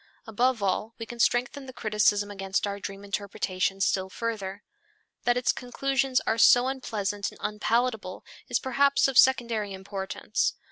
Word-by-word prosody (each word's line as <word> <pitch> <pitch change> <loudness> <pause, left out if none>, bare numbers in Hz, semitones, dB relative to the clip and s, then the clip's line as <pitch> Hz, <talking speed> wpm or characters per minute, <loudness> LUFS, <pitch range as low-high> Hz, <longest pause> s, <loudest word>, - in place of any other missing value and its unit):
Above 230 +1 +1
all 210 +4 -1
we 225 - -6
can 240 +1 -10
strengthen 245 +4 +1
the - - -7
criticism 210 -2 +1
against 195 0 -2
our 200 0 -4
dream 195 0 -7
interpretation 195 -1 -2
still 190 -1 +1
further. 205 -2 -4 0.6
That 245 0 +3
its 250 - +2
conclusions 270 +1 0
are 225 - 0
so 245 +2 +7
unpleasant 205 -6 -3
and - - -16
unpalatable 215 -2 -1 0.2
is - - +2
perhaps 280 +2 +2
of 270 -2 +4
secondary 235 -6 +3
importance. 190 +2 -2
215 Hz, 145 wpm, -27 LUFS, 200-245 Hz, 0.6 s, so